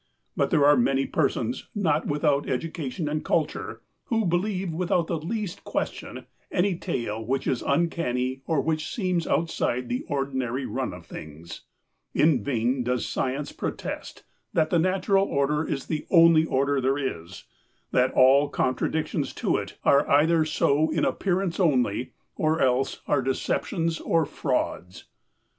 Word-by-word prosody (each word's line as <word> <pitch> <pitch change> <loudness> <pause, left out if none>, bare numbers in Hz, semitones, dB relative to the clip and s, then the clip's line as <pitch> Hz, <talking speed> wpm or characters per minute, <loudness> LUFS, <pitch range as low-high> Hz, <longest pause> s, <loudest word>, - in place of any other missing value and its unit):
But - - +1
there 150 -5 +4
are 145 0 +7
many 135 +2 +2
persons, 245 - -1
not 160 -7 +1
without 145 -1 +1
education 155 +1 -3
and 150 +1 -2
culture, - - -2 0.2
who 225 -2 0
believe 185 0 -1
without 175 0 +1
the 165 -1 -2
least 205 +3 -4
question - - -4 0.3
any 190 0 +1
tale 115 - -3
which 135 +4 -1
is 125 - 0
uncanny 135 -5 0
or 160 -4 +2
which 155 0 -2
seems 185 - -1
outside 125 -7 0
the 125 - -2
ordinary 135 -2 -2
run - - -3
of - - -10
things. 80 +2 -10 0.5
In 145 -8 +3
vain 125 +1 0
does 125 0 -1
Science 135 +3 -2
protest - - -5 0.3
that 155 0 +2
the 170 - +3
natural 195 +2 +2
order 145 +2 +1
is 135 - -3
the 155 -2 -4
only 165 -2 +6
order 140 0 +1
there 135 +2 +1
is, 85 - -5 0.5
that 125 +1 +3
all 135 +3 +5
contradictions 150 +4 -1
to - - 0
it - - -6
are 140 +1 +4
either 160 +2 +4
so 155 0 +2
in - - +1
appearance 190 -2 -1
only 125 - +1 0.2
or 155 +1 +1
else 130 0 +1
are 145 - +2
deceptions 165 +5 -1
or 165 -2 +1
frauds. 125 - -3
145 Hz, 145 wpm, -26 LUFS, 130-165 Hz, 0.5 s, are